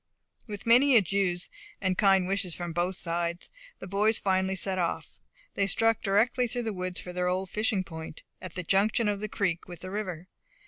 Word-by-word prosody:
With 210 Hz, +1 st, -7 dB
many 250 Hz, +4 st, +6 dB
adieus 190 Hz, -3 st, +1 dB, 0.3 s
and 185 Hz, -1 st, 0 dB
kind 195 Hz, -2 st, +4 dB
wishes 190 Hz, -2 st, 0 dB
from 175 Hz, -1 st, -5 dB
both 175 Hz, +3 st, 0 dB
sides, 170 Hz, 0 st, -3 dB, 0.3 s
the -, -, -9 dB
boys 210 Hz, +3 st, +2 dB
finally 190 Hz, 0 st, +1 dB
set 190 Hz, 0 st, -1 dB
off. 170 Hz, -, -2 dB, 0.4 s
They 200 Hz, -, +1 dB
struck 225 Hz, +3 st, +3 dB
directly 225 Hz, +5 st, +2 dB
through 245 Hz, +1 st, -2 dB
the 220 Hz, -2 st, -2 dB
woods 180 Hz, -1 st, -3 dB
for 180 Hz, -, -8 dB
their 180 Hz, 0 st, -1 dB
old 185 Hz, +1 st, -1 dB
fishing 215 Hz, -2 st, 0 dB
point, 160 Hz, -2 st, -9 dB, 0.2 s
at 185 Hz, -, -8 dB
the 180 Hz, -, -3 dB
junction 205 Hz, +5 st, +2 dB
of 205 Hz, -1 st, 0 dB
the 215 Hz, -, -3 dB
creek 180 Hz, -5 st, -1 dB
with 175 Hz, -2 st, -10 dB
the 185 Hz, -, -7 dB
river. 185 Hz, -4 st, -4 dB
190 Hz, 190 wpm, -28 LUFS, 180-210 Hz, 0.4 s, many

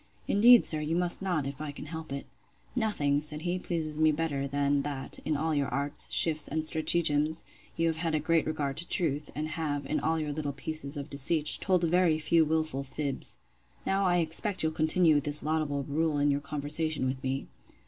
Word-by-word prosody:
Indeed, 235 Hz, +4 st, +6 dB
sir, 155 Hz, -, +1 dB
you 155 Hz, +2 st, -1 dB
must 175 Hz, +1 st, +2 dB
not, 175 Hz, -7 st, -1 dB
if 140 Hz, +2 st, -6 dB
I 150 Hz, -2 st, -4 dB
can 145 Hz, -, -9 dB
help 160 Hz, -1 st, -7 dB
it. 140 Hz, 0 st, -4 dB, 0.5 s
Nothing, 150 Hz, -, +1 dB
said 150 Hz, 0 st, -2 dB
he, 180 Hz, +1 st, -1 dB
pleases 155 Hz, -4 st, -3 dB
me 155 Hz, 0 st, +5 dB
better, 145 Hz, -3 st, -2 dB
than 140 Hz, 0 st, +1 dB
that, 140 Hz, -2 st, -5 dB
in 155 Hz, -, 0 dB
all 160 Hz, +2 st, -1 dB
your 140 Hz, -2 st, 0 dB
arts, 140 Hz, +2 st, 0 dB
shifts, 155 Hz, -2 st, +2 dB
and 160 Hz, +1 st, -2 dB
stratagems, 155 Hz, -1 st, +2 dB, 0.3 s
you 165 Hz, -, +1 dB
have 165 Hz, -1 st, 0 dB
had 165 Hz, -1 st, -1 dB
a -, -, +1 dB
great 160 Hz, +1 st, +1 dB
regard 145 Hz, -3 st, -2 dB
to 170 Hz, -, -3 dB
truth; 150 Hz, -4 st, -1 dB
and 155 Hz, +1 st, -3 dB
have, 145 Hz, -3 st, -3 dB
in 155 Hz, -, -1 dB
all 160 Hz, +1 st, 0 dB
your 155 Hz, -2 st, -2 dB
little 145 Hz, -1 st, -3 dB
pieces 145 Hz, +1 st, -2 dB
of 145 Hz, +2 st, -7 dB
deceit, 150 Hz, +2 st, +1 dB
told 185 Hz, -3 st, +2 dB
very 170 Hz, -1 st, +3 dB
few 160 Hz, +1 st, +3 dB
wilful 155 Hz, -3 st, -1 dB
fibs. 140 Hz, +1 st, -4 dB, 0.5 s
Now 195 Hz, +1 st, +1 dB
I 175 Hz, -1 st, +3 dB
expect 175 Hz, +4 st, +1 dB
you'll 160 Hz, -, +1 dB
continue 160 Hz, -1 st, +3 dB
this 145 Hz, +1 st, -1 dB
laudable 150 Hz, -2 st, -1 dB
rule 150 Hz, +2 st, -1 dB
in 145 Hz, 0 st, +2 dB
your 140 Hz, 0 st, -1 dB
conversation 150 Hz, +1 st, 0 dB
with 130 Hz, 0 st, -2 dB
me. 135 Hz, +1 st, -2 dB
155 Hz, 200 wpm, -29 LUFS, 145-165 Hz, 0.5 s, Indeed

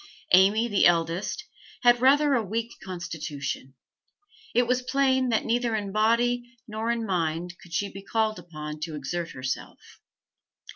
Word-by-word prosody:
Amy, 200 Hz, +5 st, +6 dB
the 205 Hz, -4 st, +4 dB
eldest, 170 Hz, +2 st, 0 dB, 0.4 s
had 240 Hz, 0 st, +5 dB
rather 285 Hz, +2 st, +5 dB
a 240 Hz, -4 st, +2 dB
weak 225 Hz, +3 st, -3 dB
constitution; 160 Hz, -7 st, -5 dB, 0.8 s
it 245 Hz, +1 st, +4 dB
was 250 Hz, +1 st, +1 dB
plain 260 Hz, -1 st, +2 dB
that 225 Hz, -, +1 dB
neither 235 Hz, -1 st, +1 dB
in 205 Hz, -2 st, -3 dB
body 240 Hz, +3 st, +1 dB
nor 220 Hz, +1 st, -3 dB
in 235 Hz, -1 st, 0 dB
mind 175 Hz, -2 st, -1 dB
could 175 Hz, -, -15 dB
she 200 Hz, +4 st, 0 dB
be 195 Hz, 0 st, -9 dB
called 215 Hz, 0 st, 0 dB
upon 155 Hz, -3 st, -7 dB
to 155 Hz, 0 st, -4 dB
exert 165 Hz, +4 st, -3 dB
herself. 130 Hz, 0 st, -6 dB
210 Hz, 145 wpm, -26 LUFS, 170-240 Hz, 0.8 s, Amy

